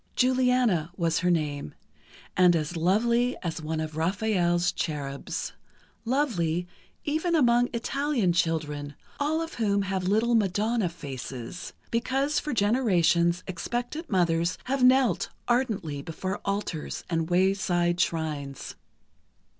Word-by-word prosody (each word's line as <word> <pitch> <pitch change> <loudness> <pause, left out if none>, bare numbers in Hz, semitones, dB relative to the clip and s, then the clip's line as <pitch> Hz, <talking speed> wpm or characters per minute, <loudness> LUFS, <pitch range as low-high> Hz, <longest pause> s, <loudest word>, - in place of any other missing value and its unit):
Juliana 250 -9 +2
was 165 -3 +1
her 180 - +1
name, 150 - -1 0.6
and 180 -1 +5
as 155 +2 -2
lovely 235 +9 +2
as 165 -2 -3
one 155 +1 -3
of 155 -1 -4
Raphael's 175 0 +1
cherubs—lovely, 170 - -3 0.4
even 315 +3 0
among 245 -4 +4
Italian 250 -4 0
children, 150 -4 -1 0.2
all 305 +3 +1
of 325 - -7
whom 200 -3 +1
have 190 -1 -2
little 220 +4 +2
madonna 215 0 +1
faces, 135 -1 -7 0.2
because 270 +5 +1
for 300 - -4
generations 185 -7 +2
expectant 240 - -4
mothers 170 -2 +1
have 265 0 -1
knelt 255 -6 +4 0.2
ardently 220 - 0
before 185 +6 -4
altars 200 -6 -3
and 165 -1 -1
wayside 175 -1 +2
shrines. 150 -5 -3
185 Hz, 110 wpm, -27 LUFS, 165-240 Hz, 0.6 s, and